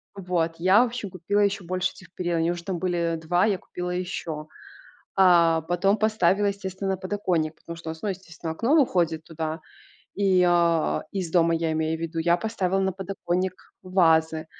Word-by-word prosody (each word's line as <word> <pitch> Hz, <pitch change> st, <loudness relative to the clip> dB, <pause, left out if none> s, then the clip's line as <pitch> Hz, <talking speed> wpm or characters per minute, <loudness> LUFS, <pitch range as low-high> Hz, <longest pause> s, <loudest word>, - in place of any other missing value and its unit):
Вот. 175 Hz, -3 st, -1 dB
Я, 185 Hz, +6 st, +5 dB
в 250 Hz, -, +1 dB
общем, 230 Hz, -5 st, -6 dB
купила 195 Hz, +3 st, 0 dB
ещё 200 Hz, -1 st, +1 dB
больше 185 Hz, +1 st, -1 dB
этих 185 Hz, -, -16 dB
перил, 175 Hz, -2 st, -1 dB
они 165 Hz, +1 st, +1 dB
уже 175 Hz, -1 st, -5 dB
там 185 Hz, -3 st, -3 dB
были 170 Hz, -2 st, 0 dB
2, 175 Hz, +4 st, +2 dB
я 200 Hz, -4 st, +1 dB
купила 180 Hz, 0 st, -6 dB
ещё. 170 Hz, -4 st, -4 dB, 0.7 s
А, 170 Hz, -4 st, +5 dB
потом 175 Hz, +5 st, +1 dB
поставила, 210 Hz, -2 st, +2 dB
естественно, 195 Hz, -1 st, -3 dB
на 190 Hz, -, -1 dB
подоконник, 180 Hz, -5 st, -1 dB
потому 170 Hz, -, -9 dB
что 165 Hz, -1 st, -7 dB
у -, -, -1 dB
нас, 160 Hz, +4 st, -11 dB
ну, 210 Hz, -, 0 dB
естественно, 170 Hz, -3 st, -6 dB
окно 235 Hz, -, +1 dB
выходит 170 Hz, -, +2 dB
туда 160 Hz, 0 st, -4 dB, 0.6 s
и, 190 Hz, -2 st, +3 dB
а, 170 Hz, -2 st, +2 dB
из 185 Hz, -4 st, -3 dB
дома, 165 Hz, -1 st, +3 dB
я 165 Hz, -1 st, 0 dB
имею 160 Hz, +1 st, -1 dB
в -, -, -12 dB
виду. 165 Hz, 0 st, -4 dB
Я 170 Hz, +1 st, +3 dB
поставила 195 Hz, -3 st, -1 dB
на 190 Hz, -1 st, 0 dB
подоконник 185 Hz, -1 st, -3 dB
вазы. 160 Hz, -4 st, +2 dB
180 Hz, 185 wpm, -25 LUFS, 165-195 Hz, 0.7 s, Я